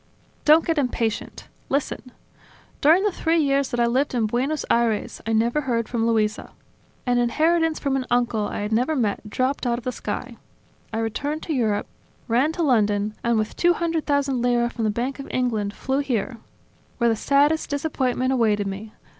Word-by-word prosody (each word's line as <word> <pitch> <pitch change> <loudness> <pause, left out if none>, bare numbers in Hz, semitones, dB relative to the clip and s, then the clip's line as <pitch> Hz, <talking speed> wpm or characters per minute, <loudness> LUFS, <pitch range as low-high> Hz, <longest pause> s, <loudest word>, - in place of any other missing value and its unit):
"Don't 315 +2 +6
get 325 -2 +1
impatient. 235 -4 -2 0.2
Listen. 270 -2 -2 0.7
During 325 +7 +5
the 415 - +2
three 335 -1 0
years 280 -3 +2
that 240 - -2
I 235 - +4
lived 255 +3 0
in 230 -2 +2
Buenos 260 +7 -1
Aires, 230 -3 0
I 225 - 0
never 235 +6 +2
heard 235 -4 -1
from 230 -2 0
Luisa. 215 -2 0 0.5
An 245 -1 +2
inheritance 320 +6 +2
from 275 -2 -1
an 260 -1 -2
uncle 240 -3 +1
I - - -4
had 210 +1 -3
never 250 +8 +1
met 215 -4 -1
dropped 255 +3 -1
out 235 0 +1
of 240 - -8
the 255 - -2
sky, - - -5 0.5
I 225 - -3
returned 285 +8 -2
to 320 - -2
Europe, 220 -6 0 0.4
ran 255 +6 +2
to 340 - -1
London... 210 -6 +2
and 235 -1 +2
with 215 0 -2
two 350 0 +3
hundred 335 -2 -2
thousand 280 -3 +1
lire 240 -1 +2
from 230 -2 -3
the - - +2
Bank 245 +6 -2
of 275 - -7
England 220 -5 -1
flew 265 +5 -2
here... 245 -4 -2 0.6
where 235 - +2
the - - +1
saddest 285 +7 +2
disappointment 265 -3 0
awaited 215 -5 +2
me. 200 +3 -6
245 Hz, 185 wpm, -23 LUFS, 225-285 Hz, 0.7 s, Don't